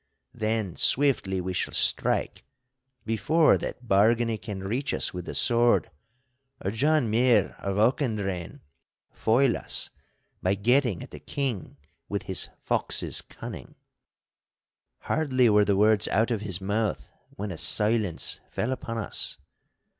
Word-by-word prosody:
Then 110 Hz, -4 st, -2 dB
swiftly 125 Hz, -9 st, +2 dB
we 95 Hz, +1 st, -4 dB
shall -, -, -2 dB
strike, -, -, +1 dB, 0.6 s
before 150 Hz, +9 st, +3 dB
that 125 Hz, -, -6 dB
Bargany 110 Hz, +2 st, +2 dB
can 95 Hz, -3 st, -6 dB
reach 125 Hz, +9 st, -2 dB
us -, -, 0 dB
with 90 Hz, -1 st, -6 dB
the -, -, -6 dB
sword, 120 Hz, -6 st, +3 dB, 0.7 s
or 95 Hz, -, -3 dB
John 145 Hz, +4 st, +2 dB
Muir 115 Hz, -2 st, +3 dB
of 100 Hz, 0 st, -3 dB
Auchendrayne 105 Hz, -, -1 dB, 0.5 s
foil 120 Hz, +3 st, +2 dB
us -, -, +2 dB, 0.5 s
by 95 Hz, +2 st, +1 dB
getting 120 Hz, -1 st, +1 dB
at -, -, -12 dB
the -, -, -9 dB
King 130 Hz, -, -4 dB, 0.3 s
with -, -, -3 dB
his -, -, -1 dB
fox's -, -, 0 dB
cunning.' -, -, -10 dB, 1.3 s
Hardly 130 Hz, -6 st, +2 dB
were 105 Hz, 0 st, +4 dB
the 100 Hz, -1 st, +1 dB
words 105 Hz, 0 st, +3 dB
out 110 Hz, +4 st, +1 dB
of 110 Hz, -3 st, -1 dB
his 95 Hz, -4 st, -3 dB
mouth 100 Hz, +1 st, -2 dB, 0.2 s
when 100 Hz, 0 st, -5 dB
a 85 Hz, -, -6 dB
silence 105 Hz, -5 st, +1 dB
fell 120 Hz, -, -2 dB
upon 115 Hz, -3 st, -4 dB
us. 110 Hz, -, -2 dB
110 Hz, 130 wpm, -26 LUFS, 100-120 Hz, 1.3 s, were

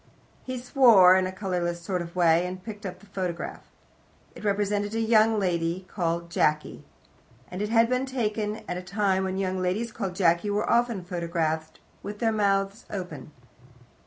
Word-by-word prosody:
He 255 Hz, 0 st, -5 dB
swore 235 Hz, -8 st, +6 dB
in 185 Hz, 0 st, +2 dB
a -, -, -4 dB
colourless 180 Hz, -3 st, -2 dB
sort 180 Hz, +1 st, -3 dB
of 170 Hz, 0 st, -8 dB
way, 170 Hz, 0 st, +3 dB
and 185 Hz, 0 st, -7 dB
picked 210 Hz, -2 st, -8 dB
the 195 Hz, -, -4 dB, 0.2 s
photograph 180 Hz, -3 st, -3 dB
up. -, -, -24 dB, 0.7 s
It -, -, -12 dB
represented 205 Hz, +1 st, 0 dB
a -, -, 0 dB
young 220 Hz, -1 st, +4 dB
lady 175 Hz, -1 st, -1 dB
called 170 Hz, -2 st, -2 dB
Jacky, 150 Hz, -2 st, 0 dB, 0.7 s
and 180 Hz, +2 st, -5 dB
had 225 Hz, +2 st, +3 dB
been 255 Hz, +2 st, 0 dB
taken 215 Hz, -4 st, -2 dB
at -, -, -2 dB
the -, -, -4 dB
time 190 Hz, 0 st, 0 dB
when 190 Hz, 0 st, -3 dB
young 190 Hz, -1 st, -1 dB
ladies 205 Hz, +6 st, -1 dB
called 195 Hz, -5 st, -4 dB
Jacky 175 Hz, +1 st, +2 dB
were 205 Hz, +1 st, 0 dB
often 235 Hz, -5 st, +1 dB
photographed 165 Hz, -3 st, -2 dB, 0.2 s
with 205 Hz, +1 st, -6 dB
their 225 Hz, 0 st, +1 dB
mouths 200 Hz, 0 st, 0 dB
open. 180 Hz, -5 st, -6 dB
190 Hz, 165 wpm, -26 LUFS, 175-215 Hz, 0.7 s, swore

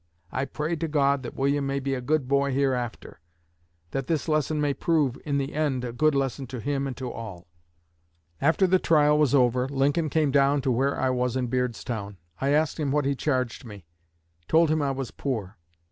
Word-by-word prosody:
I 130 Hz, +3 st, -1 dB
pray 150 Hz, +4 st, -3 dB
to 165 Hz, -, -2 dB
God 140 Hz, -2 st, +2 dB
that 120 Hz, -, -7 dB
William 140 Hz, +1 st, 0 dB
may 140 Hz, 0 st, -1 dB
be 135 Hz, 0 st, -2 dB
a 130 Hz, -, -2 dB
good 145 Hz, +1 st, 0 dB
boy 140 Hz, +1 st, +2 dB
hereafter; 130 Hz, -7 st, -2 dB, 0.7 s
that 135 Hz, -2 st, -3 dB
this 160 Hz, -2 st, -1 dB
lesson 155 Hz, 0 st, +1 dB
may 145 Hz, -1 st, +1 dB
prove 150 Hz, -5 st, +1 dB
in 145 Hz, -2 st, 0 dB
the 140 Hz, +1 st, -2 dB
end 145 Hz, -5 st, 0 dB
a 120 Hz, -, -5 dB
good 155 Hz, +4 st, +2 dB
lesson 135 Hz, 0 st, -1 dB
to 125 Hz, 0 st, -6 dB
him 140 Hz, +2 st, -1 dB
and 130 Hz, -, -6 dB
to 130 Hz, -2 st, -4 dB
all.' 100 Hz, -6 st, -8 dB, 1.0 s
After 160 Hz, +6 st, +3 dB
the 185 Hz, 0 st, +3 dB
trial 150 Hz, -3 st, +4 dB
was 145 Hz, -2 st, +3 dB
over, 125 Hz, 0 st, +2 dB
Lincoln 145 Hz, +3 st, +1 dB
came 150 Hz, -1 st, +1 dB
down 140 Hz, +1 st, +3 dB
to 130 Hz, -, +1 dB
where 135 Hz, +4 st, +1 dB
I 130 Hz, -, +1 dB
was 125 Hz, -1 st, 0 dB
in 125 Hz, -2 st, -1 dB
Beardstown. 120 Hz, -5 st, -3 dB, 0.2 s
I 135 Hz, -, 0 dB
asked 150 Hz, +2 st, +1 dB
him 145 Hz, -3 st, 0 dB
what 145 Hz, 0 st, +1 dB
he 140 Hz, -, +2 dB
charged 130 Hz, -3 st, -1 dB
me; 105 Hz, -7 st, -11 dB, 0.6 s
told 160 Hz, -1 st, +4 dB
him 155 Hz, -1 st, +1 dB
I 140 Hz, -, 0 dB
was 135 Hz, -2 st, -4 dB
poor. 110 Hz, -8 st, -4 dB
140 Hz, 205 wpm, -26 LUFS, 125-150 Hz, 1.0 s, trial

